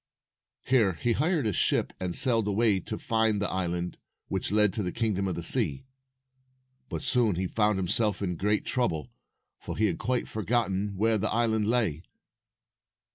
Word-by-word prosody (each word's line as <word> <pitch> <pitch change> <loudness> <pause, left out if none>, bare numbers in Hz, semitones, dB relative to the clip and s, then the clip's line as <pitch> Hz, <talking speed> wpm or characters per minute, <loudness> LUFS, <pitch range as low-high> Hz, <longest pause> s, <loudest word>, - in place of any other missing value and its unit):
Here 115 -8 +3
he 115 +9 -1
hired 155 +3 +1
a 105 - 0
ship, - - +1
and 90 -2 -3
sailed 115 -4 +3
away 105 -1 +2
to 110 +4 -5
find 110 -2 +1
the 105 - -1
island 90 -1 -3 0.3
which 95 0 -2
led 105 -2 +3
to 110 - -2
the 90 -3 -2
Kingdom 105 -4 -1
of 95 - -2
the 85 - -5
Sea. 70 - +2 1.0
But - - -5
soon 115 -7 +2
he 95 +2 -2
found 105 +2 +1
himself 95 +2 +1
in 90 -3 -2
great 105 +4 0
trouble, 100 - -1 0.5
for - - -7
he 110 - +2
had 90 -6 -1
quite 125 -1 -1
forgotten 105 -2 -1
where 110 +1 +2
the 110 +2 0
island 110 -2 +1
lay. 110 -10 +1
105 Hz, 170 wpm, -27 LUFS, 95-115 Hz, 1.0 s, Here